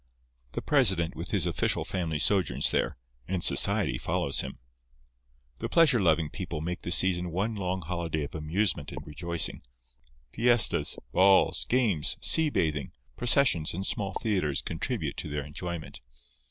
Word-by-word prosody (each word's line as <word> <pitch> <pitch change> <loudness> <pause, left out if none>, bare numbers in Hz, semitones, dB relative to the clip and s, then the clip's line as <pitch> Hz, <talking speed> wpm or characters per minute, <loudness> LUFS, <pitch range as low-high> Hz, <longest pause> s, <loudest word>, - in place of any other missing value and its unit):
The - - -4
president 95 - +3
with 85 +3 -5
his 95 -5 +1
official 85 -1 -1
family 85 -4 -3
sojourns 95 +3 +2
there; - - -1 0.3
and 90 -1 -2
society - - +2
follows 70 - -1
him. 65 - -8 1.0
The - - -4
pleasure 150 -8 +4
loving 80 -4 +1
people 90 -5 -5
make 85 +3 -5
the 85 - -5
season 90 -1 +3
one 100 +7 -2
long 95 -2 -3
holiday 85 -2 -3
of 70 - -8
amusement 80 -1 -2
and 70 +2 -8
rejoicing. 85 +3 -2 0.7
Fiestas, 120 -1 +3
balls, 95 +1 +4
games, 110 - +1
sea 160 -1 +4
bathing, 75 - -2 0.2
processions 120 - +2
and 95 +2 -4
small 100 -1 -2
theatres 90 -11 -1
contribute - - -4
to - - -5
their 75 -1 -4
enjoyment. 85 +1 -7
90 Hz, 140 wpm, -27 LUFS, 80-100 Hz, 1.0 s, pleasure